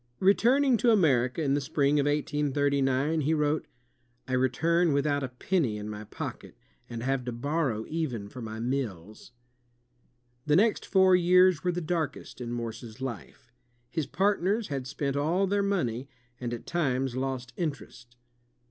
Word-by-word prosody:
Retmning 245 +6 +4
to 240 - +3
America 145 - +3
in 140 -2 +1
the 145 - +1
spring 140 +1 +1
of 145 - +1
1839, 145 0 +1
he 155 +3 +1
wrote: 150 0 0 0.6
"I 130 - -3
retimi 160 +7 +2
without 145 0 +1
a 130 - -3
penny 130 - -1
in 105 0 -6
my 105 0 -7
pocket, - - -7 0.3
and 115 -1 -5
have 135 0 0
to 125 - -3
borrow 130 -2 -1
even 135 -11 -3
for 125 +5 -9
my 110 -1 -6
meals." 110 -7 -4 1.2
The 150 - +4
next 215 +5 +2
four 190 -1 +5
years 180 -2 +4
were 180 - +1
the 175 0 -3
darkest 160 -5 -3
in 120 -1 -4
Morse's 115 -1 -6
life. 125 -1 -7 0.4
His 160 -4 -2
partners 200 +2 +1
had 135 -3 -3
spent 140 0 -2
all 165 +7 +1
their 200 +1 +1
money, 140 - -1 0.3
and 120 -2 -4
at 120 - -6
times 135 -6 -1
lost 130 -1 -3
interest. 135 -6 -5
140 Hz, 155 wpm, -28 LUFS, 125-170 Hz, 1.2 s, four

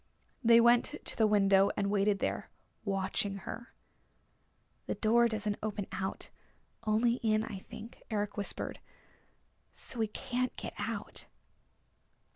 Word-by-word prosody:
They 230 0 +8
went 240 +4 +5
to - - +1
the 220 - +4
window 195 -1 +5
and 200 0 +1
waited 205 0 +3
there, - - -2 0.3
watching 195 0 0
her. 235 0 -7 1.2
"The - - -1
door 235 +2 +4
doesn't 210 -2 -1
open 210 -2 -2
out, 190 0 -3 0.6
only 235 +3 +3
in, 215 -2 +2
I 200 -3 -5
think," 225 +4 -11
Eric 205 -2 -1
whispered. 200 -1 -4 0.9
"So 240 - -3
we 220 - +2
can't 255 +3 -2
get - - -6
out." - - -4
215 Hz, 125 wpm, -32 LUFS, 200-235 Hz, 1.2 s, They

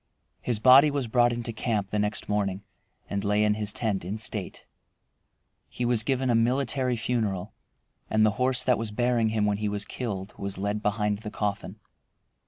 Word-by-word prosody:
His 120 -3 +1
body 130 +6 +7
was 140 -4 -2
brought 120 +1 +3
into 120 -1 -4
camp 110 -3 -2
the 105 - 0
next 105 +1 -2
morning 100 -1 -1 0.4
and 100 0 -3
lay 105 +1 +2
in 105 0 +3
his 105 -1 -1
tent 105 -5 -2
in 95 +5 -4
state. 110 - -4 1.0
He 125 - -3
was 120 -2 +3
given 130 +1 0
a - - +3
military 125 +2 +1
funeral, 110 -4 -2 0.6
and 110 0 +3
the 110 - +3
horse 125 0 +3
that 125 -2 +2
was 115 -1 -3
bearing 120 +1 +1
him 110 -1 0
when 105 -1 +1
he 105 -1 -1
was 100 0 -3
killed 100 -6 -5
was 100 -1 -4
led 100 +2 -2
behind 105 0 0
his 105 -2 -6
coffin. 100 -2 -3
110 Hz, 185 wpm, -27 LUFS, 105-120 Hz, 1.0 s, body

